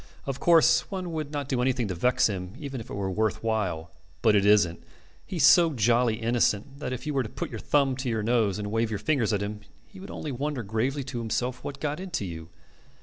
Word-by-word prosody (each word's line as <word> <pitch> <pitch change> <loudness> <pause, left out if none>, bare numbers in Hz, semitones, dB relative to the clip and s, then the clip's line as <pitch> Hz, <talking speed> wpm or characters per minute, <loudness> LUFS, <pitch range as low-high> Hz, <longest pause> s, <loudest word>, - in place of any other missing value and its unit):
Of 135 -1 -4
course 165 -1 +4
one 185 -3 -4
would 155 -3 -3
not 145 -3 -3
do 130 -3 0
anything 125 -2 +1
to - - -1
vex 125 +9 +2
him 95 -2 -5
even 140 -5 -6
if - - -11
it - - -6
were 95 -1 -2
worth 110 +1 -1
while. 95 -8 -1 0.3
But 110 -2 +5
it 100 0 +3
isn't. 100 -5 +4 0.5
He's 165 -7 +2
so 170 -3 +6
jolly 120 -1 +2
innocent 120 +3 0
that 130 - -4
if 130 +3 -5
you 150 - -2
were 135 - +2
to 110 - -5
put - - -5
your 115 - -5
thumb 135 +4 +2
to 130 -2 -3
your 110 -2 -1
nose 110 -4 +2
and 105 -1 -4
wave 115 0 +1
your 110 - -2
fingers 125 -3 +1
at 100 -1 0
him 105 +1 -5 0.3
he 195 - -15
would 190 - -9
only 150 - -5
wonder 140 0 -3
gravely 120 +7 -1
to 130 -2 -5
himself 125 +2 -2
what 140 -1 -6
got 150 +2 -2
into 180 - -3
you. 80 -2 -7
120 Hz, 235 wpm, -27 LUFS, 105-140 Hz, 0.5 s, so